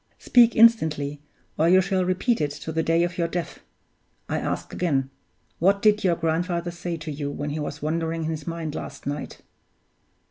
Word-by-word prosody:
Speak 235 -2 +4
instantly, 155 -11 +4 0.4
or 165 +2 +4
you 185 +1 +7
shall 190 0 +1
repeat 185 +5 0
it 150 - +1
to 145 +2 -7
the 160 +1 0
day 165 +1 +2
of 175 +1 -3
your 170 - +2
death! 175 0 -4 0.7
I - - -1
ask - - -4
again 135 -6 0 0.5
what 200 +3 +3
did 210 -1 +4
your 180 -3 +3
grandfather 170 +1 -1
say 170 0 -5
to 155 -1 -6
you 145 0 -4
when 145 +1 -4
he 155 - -3
was 150 0 -5
wandering 165 +1 -1
in 160 - -2
his 155 -2 -6
mind 165 -2 -4
last 140 - -7
night?" 145 +1 -5
165 Hz, 185 wpm, -24 LUFS, 150-180 Hz, 0.7 s, you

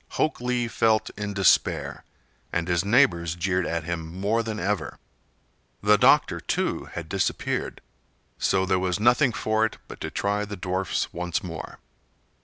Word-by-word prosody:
Hok 155 - 0
Lee 125 -1 0
felt 110 -1 +1
in 105 -1 -5
despair, 95 -3 +2 0.5
and 85 0 -1
his 85 -1 +1
neighbors 95 - +3
jeered 90 +1 0
at 85 -1 -2
him 80 -1 -4
more 105 +4 +1
than 110 -1 -4
ever. 100 +4 -2 0.9
The 105 0 +5
doctor, - - +4
too, - - -1
had 80 - -7
disappeared, 95 +1 -2 0.6
so 95 -1 +2
there 95 0 +1
was 90 +1 -1
nothing 120 +4 +4
for 110 0 0
it 110 - -1
but - - -11
to - - -3
try 100 +1 -1
the 105 -1 -6
dwarfs 90 +1 -2
once 85 0 -2
more. 80 -3 -7
95 Hz, 155 wpm, -25 LUFS, 90-110 Hz, 0.9 s, The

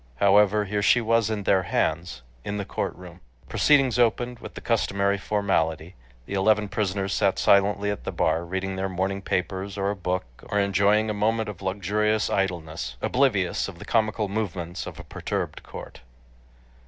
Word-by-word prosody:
However, 105 +2 +4
here 105 +1 -1
she 110 +4 +5
was 115 -1 +2
in 105 -2 -2
their 95 -1 +3
hands, 80 -5 -1 0.2
in 100 - -3
the 100 - -3
courtroom. 90 -1 -5 0.3
Proceedings 135 -5 +3
opened 120 +1 +1
with - - -10
the - - -6
customary 100 -3 +1
formality. 85 -5 0 0.3
The - - -7
eleven 105 +1 +2
prisoners 100 -1 -1
sat 95 -1 +2
silently 100 +1 +3
at 105 - -5
the - - -3
bar, 80 +2 +1
reading 95 +2 -3
their 95 0 -1
morning 95 +2 -2
papers, 95 +2 -2
or 100 0 0
a - - -3
book, 90 -4 -2 0.2
or 105 - +1
enjoying 100 +2 +3
a - - -1
moment 110 +1 0
of 100 -3 -8
luxurious 105 +3 0
idleness, 80 -9 -2
oblivious 110 - +1
of 95 -4 -9
the - - -10
comical 110 -2 +1
movements 95 -4 -4
of - - -8
a - - -7
perturbed - - -4
court. - - -10
100 Hz, 165 wpm, -25 LUFS, 95-105 Hz, 0.3 s, she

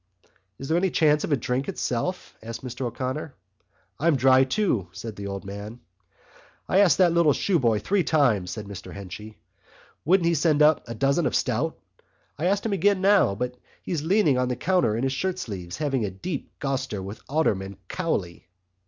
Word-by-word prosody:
"Is 135 - -7
there 165 +3 +2
any 190 +1 +1
chance 150 -3 +3
of - - -3
a 145 - +3
drink 125 +3 -2
itself?" 180 +10 -3
asked 115 +2 -7
Mr 125 +1 -4
O'Connor. 130 +5 -4 0.6
"I'm 165 0 +3
dry 130 0 +5
too," 130 - 0
said 105 +5 -7
the 100 -1 -6
old 100 0 -5
man. 100 +4 -7 0.9
"I 190 - +3
asked 200 -4 +5
that 180 -3 +5
little 170 -4 +4
shoeboy 125 - +1
three 200 -2 +2
times," 125 - +2
said 105 +3 -5
Mr 100 -2 -9
Henchy, 100 +2 -9 0.7
"would 180 +2 +3
he 170 - +3
send 155 -1 +3
up 155 0 +5
a 115 - -5
dozen 140 +7 +2
of - - -2
stout. 135 +6 0 0.6
I 160 - -1
asked 200 +3 +1
him 220 - 0
again 200 +1 +2
now, 195 - +4
but 125 +3 -4 0.2
he - - -6
was 160 -4 -1
leaning 160 -7 +3
on 125 - +1
the 125 - -1
counter 175 - +1
in 120 - -2
his 135 0 0
shirt 185 +6 -2
sleeves 90 - -6
having 135 -5 0
a 105 - -1
deep 130 - -6
goster 130 -8 -2
with 100 +3 -8
Alderman 100 - 0
Cowley." 95 - -3
135 Hz, 190 wpm, -25 LUFS, 110-170 Hz, 0.9 s, dry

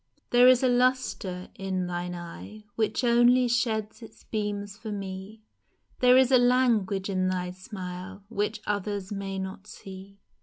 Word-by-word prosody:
THERE 245 +1 +7
is 255 0 +6
a - - +5
lustre 245 -7 0
in 190 -1 -3
thine 175 0 -4
eye 175 +5 -9
Which 220 +3 -1
only 245 +1 +5
sheds 225 -2 -1
its 220 -1 -13
beams 205 -2 -3
for 220 0 -7
me, 195 +2 -7 0.6
There 250 0 +6
is 260 0 +4
a 255 - +7
language 235 -6 +2
in 185 -2 0
thy 180 -1 -2
smile 185 0 -8
Which 210 0 -2
others 205 -1 -3
may 195 -1 -4
not 190 +1 -6
see 195 -2 -11
205 Hz, 150 wpm, -27 LUFS, 190-235 Hz, 0.6 s, THERE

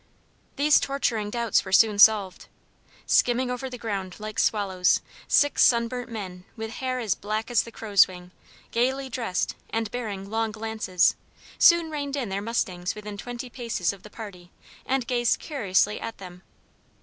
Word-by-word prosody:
These 295 +1 +5
torturing 235 -6 -1
doubts 235 -1 +1
were - - -8
soon 205 +1 +5
solved. 205 -4 +5 0.6
Skimming 250 +1 +2
over 250 +1 -4
the 250 - -7
ground 200 -5 -4
like 215 0 -5
swallows, 190 -4 +2 0.3
six 290 0 +3
sunburnt 240 +1 +2
men 185 -5 -7
with 220 0 -5
hair 255 +2 -3
as 225 -7 0
black 215 +3 -4
as 240 - +4
the 230 - -10
crow's 205 -4 +4
wing, 180 -1 -11 0.4
gaily 265 +3 0
dressed, 225 -7 -2 0.2
and 225 -2 -2
bearing 205 -5 -5
long 220 +1 -1
lances, 220 -4 +1 0.4
soon 340 -2 +6
reined 285 -2 -3
in 255 -7 -3
their 195 +1 -2
mustangs 185 -5 -2
within 210 -1 -7
twenty 245 +4 -6
paces 230 -8 -2
of 195 - -14
the 210 - -12
party 195 -6 -10 0.4
and 265 -2 0
gazed 240 -2 +1
curiously 210 - 0
at 230 - -6
them. 180 -2 -11
220 Hz, 160 wpm, -26 LUFS, 200-245 Hz, 0.6 s, soon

